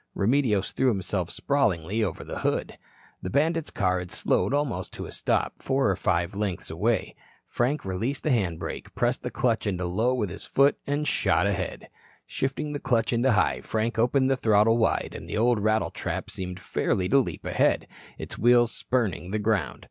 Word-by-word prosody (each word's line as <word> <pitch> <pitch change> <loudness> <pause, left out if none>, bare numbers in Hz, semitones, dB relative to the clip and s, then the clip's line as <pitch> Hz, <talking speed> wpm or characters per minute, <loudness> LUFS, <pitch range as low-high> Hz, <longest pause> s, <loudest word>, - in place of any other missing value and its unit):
Remedios 110 -3 +1
threw 130 - +1
himself 95 -5 0
sprawlingly 110 - 0
over 95 -7 -3
the - - -6
hood. - - -2 0.4
The 90 - -4
bandits' 160 - +1
car 90 -2 0
had 90 0 -7
slowed 105 - +1
almost 145 -3 -1
to - - -6
a - - -9
stop, - - -1
four 135 -6 +1
or - - 0
five 85 +1 0
lengths 100 -4 -3
away. 110 +8 0 0.3
Frank 130 +3 -1
released 115 +9 -2
the 155 - +1
hand 95 -9 +1
brake, - - -7
pressed - - 0
the - - -3
clutch 115 -3 0
into 90 -2 -1
low 110 +9 +1
with 105 -7 -2
his - - -7
foot, 140 +1 +3
and 145 +1 -1
shot - - +2
ahead. 95 -3 -2 0.4
Shifting 145 +3 -3
the 145 - -3
clutch 120 -3 +1
into 120 +2 +3
high, 105 - +2
Frank 115 +1 -2
opened 130 +3 +3
the 135 - +2
throttle 110 0 +4
wide 115 - +1
and - - -8
the - - -2
old 120 0 +3
rattletrap 110 +1 -1
seemed 90 -1 -5
fairly 90 -1 -1
to 140 - +5
leap 130 - -3
ahead, - - +2 0.3
its - - -7
wheels 120 0 +5
spurning 110 -8 -1
the 105 - -1
ground. 105 - 0
110 Hz, 185 wpm, -26 LUFS, 95-130 Hz, 0.4 s, to